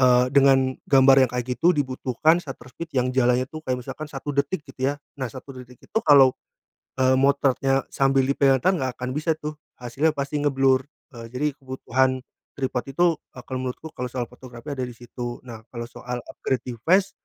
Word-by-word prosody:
eee, 125 -1 +5
dengan 135 -2 +5 0.2
gambar 135 -1 +7
yang - - -14
kayak 125 -1 -2
gitu 175 +2 +4
dibutuhkan 140 +4 +1
shutter 135 -6 -10
speed 165 +2 -8
yang 125 0 +1
jalannya 125 -1 +3
itu 155 - -8
kayak 130 - 0
misalkan 150 +5 -7
1 145 +1 -5
detik, 145 +3 0
gitu 135 0 -2
ya. - - -7 0.3
Nah, 130 - -1
1 130 +3 -10
detik 125 -1 -12
itu 225 - -1
kalau, 140 - +7 0.7
eee, 130 0 +4
motretnya 135 -1 +2
sambil 135 -1 +3
di - - +2
pegang 135 -2 +4
tangan, 185 +1 +4
nggak - - -2
akan 125 0 -3
bisa 155 +2 0
tuh, 150 0 -5 0.2
hasilnya 130 +6 0
pasti 140 +1 -2
ngeblur. 135 -2 +2 0.3
Eee, 115 -1 -8
jadi 130 +4 -2
kebutuhan 130 0 0 0.4
tripod 130 -2 -2
itu 175 +6 +2 0.3
akan 130 +1 -7
menurutku 130 +5 -6
kalau 125 0 -3
soal 125 -2 -3
fotografi 125 +2 -10
ada 130 - -3
di - - -8
situ. 120 0 -7
Nah, 110 -2 -9
kalau 120 -1 -6
soal 125 0 -6
upgrade 130 -3 -3
device, 165 - +1
130 Hz, 190 wpm, -24 LUFS, 125-140 Hz, 0.7 s, gambar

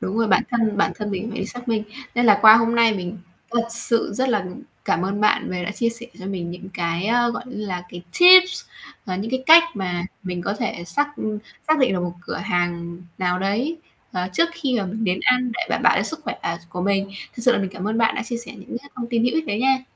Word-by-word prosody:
Đúng 195 +4 -3
rồi, 230 -2 +2
bản - - +4
thân 225 -4 +1
bản 205 - +2
thân 210 -2 -4
mình 190 -1 -3
cũng 225 - -5
phải 225 - -4
xác 245 0 -9
minh, 220 -2 +1 0.3
nên 240 0 +2
là 210 -2 +6
qua 220 0 +10
hôm 230 0 +2
nay 230 -2 +4
mình 185 +2 -5 0.3
thật 235 0 +1
sự 230 -1 0
rất 260 +2 0
là 210 -5 +1
mình 180 0 -9 0.2
cảm 170 - +1
ơn 200 +2 -2
bạn 210 - +2
về 180 -1 -3
đã 210 - -3
chia 230 +2 0
sẻ 230 +1 -7
cho 185 - -7
mình 180 -3 -4
những 180 +2 -9
cái, 170 +2 -1
ơ, 240 +1 +2
gọi 240 - -5
như 215 -4 -6
là, 180 -2 -4
cái, 175 0 -9 0.2
tips 370 0 +8 0.4
và 185 -1 -2
những 215 +5 -4
cái 260 0 -1
cách 330 +1 +10
mà 180 -3 -3 0.2
mình 180 -2 -4
có 200 - -2
thể 175 -4 -4
xác, 290 +12 0
ừm, 215 -1 -3 0.3
xác 315 -1 +4
định 255 -7 +3
được 180 - -1
một 175 -1 -3
cửa - - -5
hàng 175 -1 -2 0.2
nào 180 -1 0
đấy, 230 - -1 0.3
ờ, 180 -1 -2
trước 335 - +3
khi 275 -8 -1
mà 195 - -3
mình 220 +4 -4
đến 185 -2 0
ăn 250 -1 +2
để 245 - -4
đảm - - -1
bảo - - +5
cho - - +2
sức 320 0 -5
khỏe, - - -3
ờ, 170 0 -2
s 170 - -23
của 180 - -6
mình. 195 +1 0 0.2
Thực 235 - -7
sự 250 +1 +5
là - - +1
mình 190 -2 -2
cảm 190 +2 -4
ơn 225 +2 -1
bạn 225 - +3
đã - - -2
chia 235 +1 -4
sẻ 235 +2 -8
những 220 +2 -8
cái 280 +3 -17
thông 240 -2 -4
tin 230 -1 +1
hữu 245 - +1
ích 320 -1 0
đấy 210 -3 -2
nha. 265 0 +2
215 Hz, 275 wpm, -22 LUFS, 185-240 Hz, 0.4 s, qua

